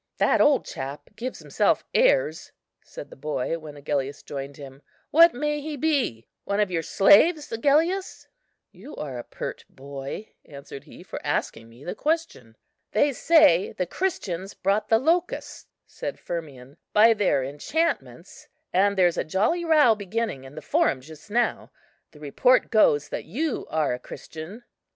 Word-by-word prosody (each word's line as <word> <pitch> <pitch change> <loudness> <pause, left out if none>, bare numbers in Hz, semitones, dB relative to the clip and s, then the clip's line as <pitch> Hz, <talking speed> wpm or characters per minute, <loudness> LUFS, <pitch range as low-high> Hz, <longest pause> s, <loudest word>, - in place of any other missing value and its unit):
"That - - +3
old 295 -1 +4
chap 135 +2 -7
gives 245 +4 -5
himself - - 0
airs," - - +2 0.3
said - - -10
the - - -11
boy, 150 +2 -3
when 150 -2 -10
Agellius 140 -1 -3
joined 140 0 -7
him; 135 -1 -11 0.3
"what 335 +2 +7
may 295 +2 -1
he 300 0 -5
be? 270 - 0 0.2
one 200 +1 -2
of 205 -3 +1
your 165 -2 0
slaves, 290 - +4
Agellius?" 315 +11 +1 0.4
"You're 145 - -8
a - - -6
pert - - -7
boy," 140 +8 -8
answered 140 -1 -11
he, - - -13
"for - - -7
asking 115 0 -2
me 120 +4 -16
the 175 - -4
question." 305 - -3 0.4
"They 280 +6 +3
say 280 - +4
the 180 - -2
Christians 195 - -3
brought 200 +3 0
the 225 - +5
locusts," 335 +8 -1 0.2
said - - -6
Firmian, 140 -6 -7 0.2
"by 225 +2 +7
their 200 -10 +1
enchantments; 220 - -3 0.3
and 200 +2 +3
there's 175 -2 +3
a - - +1
jolly 215 - 0
row 305 -8 +5
beginning 205 -8 -4
in 135 +2 -12
the 155 - -8
Forum 130 - +1
just 155 +6 -14
now. 235 +3 0 0.4
The 150 - -18
report 150 - +2
goes 145 - +3
that - - -5
you 280 - -3
are 155 -4 0
a 125 - -4
Christian." 160 - -10
195 Hz, 155 wpm, -25 LUFS, -, 0.4 s, what